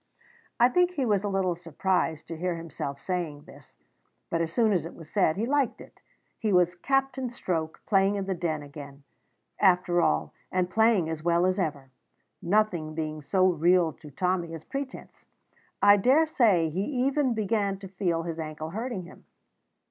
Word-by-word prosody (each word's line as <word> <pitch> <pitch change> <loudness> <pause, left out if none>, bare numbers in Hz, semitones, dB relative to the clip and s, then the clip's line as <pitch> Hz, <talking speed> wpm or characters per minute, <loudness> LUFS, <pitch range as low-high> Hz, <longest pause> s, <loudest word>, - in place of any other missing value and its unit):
I 240 - +7
think 355 +8 +3
he 280 -6 -1
was 205 -3 +1
a - - -1
little 190 -2 +1
surprised 170 -1 -1
to 165 - -5
hear 175 +2 -2
himself 145 -4 -6
saying 160 -3 -3
this; - - -17 0.6
but, 165 - +1
as 165 - -2
soon 225 -3 +2
as 180 - +1
it 165 - -8
was 165 - -12
said, 185 -5 +2
he 220 - 0
liked 280 0 0
it. - - -15 0.4
He 215 -2 0
was 180 -2 +4
Captain 265 +5 -1
Stroke 165 -9 -3
playing 195 0 +3
in 200 -1 -2
the 195 - -1
Den 165 -4 -2
again, 140 -1 -11 0.6
after 180 -2 +3
all, 75 - +1 0.2
and 180 -1 0
playing 220 -6 +3
as 160 -1 -4
well 170 +2 +2
as 185 +1 +1
ever. 145 -6 -3 0.5
Nothing 175 -5 0
being 155 -1 -4
so 185 +6 +2
real 175 -1 +3
to 155 -2 -13
Tommy 175 +2 -1
as 160 - -10
pretence, 275 +4 -7 0.6
I 205 0 +8
daresay 240 - +3
he 180 +5 -2
even 265 0 0
began 205 -2 0
to 195 0 -9
feel 180 -3 -1
his 165 -1 -5
ankle 155 0 -5
hurting 220 -1 -4
him. 175 - -15
180 Hz, 175 wpm, -27 LUFS, 160-210 Hz, 0.6 s, I